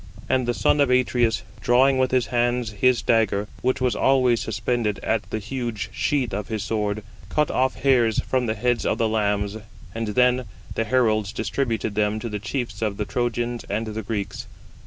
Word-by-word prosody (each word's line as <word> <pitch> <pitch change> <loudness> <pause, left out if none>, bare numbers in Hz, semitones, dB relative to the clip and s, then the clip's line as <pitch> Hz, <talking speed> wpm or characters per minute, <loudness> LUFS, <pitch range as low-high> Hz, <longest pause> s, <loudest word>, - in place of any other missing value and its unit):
And 130 -2 +1
the 120 - 0
son 145 - +3
of 140 - +3
Atreus, 120 -3 +2 0.2
drawing 130 +3 +4
with 130 0 +3
his 130 -2 +2
hands 120 -1 +1
his 125 +4 +2
dagger, 105 -3 +2
which 130 +1 +1
was 125 -1 +1
always 130 -3 +3
suspended 110 -1 -1
at 110 -1 -1
the - - -2
huge 115 0 -4
sheath 130 -7 0
of 100 0 -3
his 110 -2 -3
sword, 105 -1 -2 0.3
cut 150 -1 +1
off 130 +1 +1
hairs 120 -6 +3
from 130 -2 0
the 110 - 0
heads 120 +2 0
of - - 0
the 115 -2 +2
lambs: 105 -1 0 0.4
and 115 0 -3
then 125 +3 +2 0.3
the 115 - -1
heralds 110 -4 +2
distributed 115 -2 -2
them 105 0 +1
to 115 - -5
the 105 -1 -4
chiefs 120 +5 -4
of 105 -3 -1
the 105 - -2
Trojans 120 0 -2
and 110 +3 -2
the 110 0 -4
Greeks. 100 -2 -4
115 Hz, 185 wpm, -24 LUFS, 110-125 Hz, 0.4 s, drawing